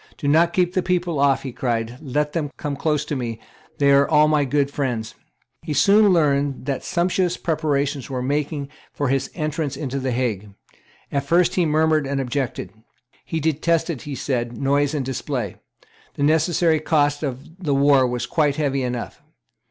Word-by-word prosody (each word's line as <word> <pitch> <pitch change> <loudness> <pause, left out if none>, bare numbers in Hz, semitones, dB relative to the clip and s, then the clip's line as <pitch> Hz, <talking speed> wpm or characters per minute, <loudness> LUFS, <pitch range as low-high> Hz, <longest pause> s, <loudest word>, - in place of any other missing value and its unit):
"Do 145 - -3
not 165 +4 +4
keep 180 -1 +1
the 185 - +1
people 175 -4 -1
off;" 140 -1 +3
he 135 - -5
cried: 120 0 -2
"let 150 +1 -1
them 155 -4 -1
come 145 -1 -3
close 150 +1 0
to 150 - -3
me; 115 -4 -4 0.4
they 140 -1 +4
are 140 0 +4
all 150 -1 +5
my 150 -2 +2
good 140 +1 0
friends." 120 -6 -3 0.5
He 155 -3 -4
soon 205 +6 +5
learned 140 -5 +1
that 140 -1 -2
sumptuous 180 0 0
preparations 145 -4 -1
were 130 -2 -3
making 145 +1 -2 0.2
for 145 -3 -2
his 135 0 0
entrance 155 -3 -2
into 140 -2 -3
the 130 0 -2
Hague. 110 -5 -2 0.6
At 140 -1 -1
first 175 +1 +3
he 180 -3 +2
murmured 155 -1 +2
and 140 0 -1
objected. 130 -5 -3 0.5
He 165 - -2
detested, 160 -1 0
he 145 -2 -6
said, 120 -3 -2
noise 140 +2 +1
and 140 -3 -2
display. 125 -5 -3 0.6
The 140 - -2
necessary 160 +1 +3
cost 145 -2 +1
of 140 +3 -6
the 145 -4 +1
war 140 -2 +4
was 120 0 -2
quite 145 0 +1
heavy 140 -3 0
enough. 125 -1 -4
145 Hz, 175 wpm, -22 LUFS, 135-155 Hz, 0.6 s, all